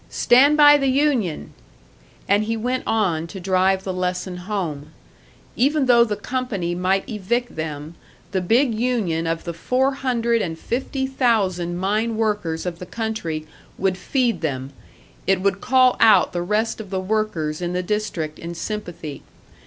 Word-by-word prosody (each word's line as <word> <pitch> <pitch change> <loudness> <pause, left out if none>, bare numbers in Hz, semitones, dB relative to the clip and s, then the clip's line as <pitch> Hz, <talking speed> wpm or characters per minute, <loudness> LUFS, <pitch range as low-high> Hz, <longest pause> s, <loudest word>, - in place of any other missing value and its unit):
Stand 280 +5 +4
by 290 -1 +8
the 275 - +1
union!" 260 - 0 0.7
And 205 +2 +3
he 225 +1 -1
went 250 +3 -1
on 175 -7 0
to 190 - -8
drive 190 +1 +1
the 190 - -3
lesson 180 0 -2
home; 170 -6 -4 0.6
even 280 +3 +2
though 240 -2 +6
the 215 -3 -2
company 210 -6 -3
might 185 +2 0
evict 235 +2 -2
them, 155 0 -5 0.4
the 190 -1 0
big 235 +7 +2
union 215 -9 0
of 165 0 -2
the 170 - -5
four 255 +11 +1
hundred 235 -4 0
and 165 -4 -3
fifty 265 - -3
thousand 200 -10 0
mine 215 +4 0
workers 205 -8 -1
of 175 -2 -4
the 180 - -8
country 185 -8 -3 0.3
would 190 -1 +1
feed 240 +5 0
them, 135 -3 -3 0.5
it 195 -1 +3
would 195 0 0
call 255 0 +4
out 215 -5 +5
the 175 - -1
rest 215 +5 -1
of 205 - -11
the 190 -1 -2
workers 185 -6 -2
in 175 0 -2
the 180 0 -1
district 180 -6 -3
in 170 +1 -6
sympathy. 170 -7 -6
200 Hz, 160 wpm, -22 LUFS, 175-235 Hz, 0.7 s, by